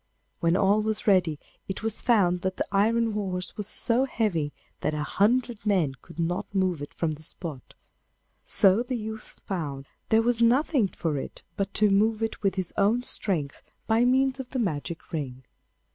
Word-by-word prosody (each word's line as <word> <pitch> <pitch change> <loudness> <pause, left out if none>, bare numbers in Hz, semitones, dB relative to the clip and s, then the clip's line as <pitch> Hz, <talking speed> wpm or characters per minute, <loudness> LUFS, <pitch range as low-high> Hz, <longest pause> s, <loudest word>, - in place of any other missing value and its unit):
When 170 +1 +2
all 200 +2 +3
was 215 0 -1
ready, 180 -7 +3 0.3
it 190 - -5
was 225 -1 +1
found 180 -7 +3
that 185 0 -2
the - - 0
iron 225 +3 +2
horse 190 -3 -3
was 210 -2 -5
so 245 +2 +1
heavy 185 - -1 0.3
that 150 - -1
a 150 - -1
hundred 230 +5 +1
men 185 -10 +2
could - - -15
not 175 +4 -2
move 185 -5 +1
it 145 - -6
from 160 -2 -1
the 150 - -11
spot, 155 -4 -7 0.7
so 195 +3 +5
the 250 0 -2
youth 220 0 -7
found 145 -8 -4 0.2
there 225 +1 +4
was 235 0 +1
nothing 250 0 +3
for 160 -6 -2
it - - -8
but 195 -1 -2
to 210 -1 +4
move 215 +3 +2
it 225 - -3
with 195 -2 +1
his 185 -3 -3
own 215 +5 +3
strength 160 - -2 0.2
by 225 +1 +3
means 265 +2 +3
of 255 -2 -6
the 265 - -4
magic 170 - -3
ring. 130 -5 -4
200 Hz, 180 wpm, -27 LUFS, 170-225 Hz, 0.7 s, so